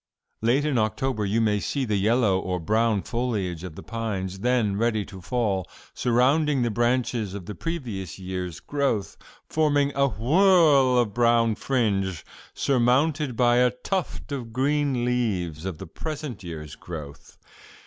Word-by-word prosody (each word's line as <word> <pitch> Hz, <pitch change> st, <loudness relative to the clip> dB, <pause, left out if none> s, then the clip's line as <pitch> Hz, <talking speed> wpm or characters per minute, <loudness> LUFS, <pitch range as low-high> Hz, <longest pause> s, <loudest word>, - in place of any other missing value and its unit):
Late 125 Hz, +6 st, +2 dB
in 140 Hz, -6 st, +1 dB
October 110 Hz, +1 st, -1 dB
you 105 Hz, +4 st, +1 dB
may 105 Hz, -2 st, +2 dB
see 135 Hz, +5 st, -2 dB
the 105 Hz, -3 st, 0 dB
yellow 105 Hz, -1 st, +2 dB
or 90 Hz, -1 st, -2 dB
brown 110 Hz, +3 st, +1 dB
foliage 105 Hz, -9 st, -2 dB
of 90 Hz, -4 st, -7 dB
the -, -, -9 dB
pines, 100 Hz, -5 st, -4 dB
then 120 Hz, -3 st, +1 dB
ready 110 Hz, -1 st, 0 dB
to 95 Hz, -2 st, -11 dB
fall, 100 Hz, -2 st, -1 dB, 0.2 s
surrounding 135 Hz, +3 st, +2 dB
the 120 Hz, -, 0 dB
branches 120 Hz, -3 st, 0 dB
of 100 Hz, -4 st, -7 dB
the 105 Hz, -, -6 dB
previous 115 Hz, -, -5 dB
year's 90 Hz, -3 st, -5 dB
growth, 140 Hz, -8 st, -1 dB, 0.3 s
forming 145 Hz, -2 st, +2 dB
a 140 Hz, 0 st, +3 dB
whorl 140 Hz, -, +4 dB
of 115 Hz, -4 st, +1 dB
brown 115 Hz, -1 st, +3 dB
fringe 100 Hz, -, -1 dB, 0.3 s
surmounted 135 Hz, +2 st, +2 dB
by 120 Hz, 0 st, +4 dB
a 125 Hz, 0 st, +5 dB
tuft 155 Hz, +6 st, -4 dB
of 125 Hz, -5 st, -4 dB
green 135 Hz, 0 st, +1 dB
leaves 95 Hz, -10 st, -1 dB
of 95 Hz, -4 st, -4 dB
the -, -, -8 dB
present 145 Hz, -, -6 dB
year's 75 Hz, -3 st, -7 dB
growth. 75 Hz, -4 st, -9 dB
115 Hz, 150 wpm, -25 LUFS, 95-130 Hz, 0.3 s, a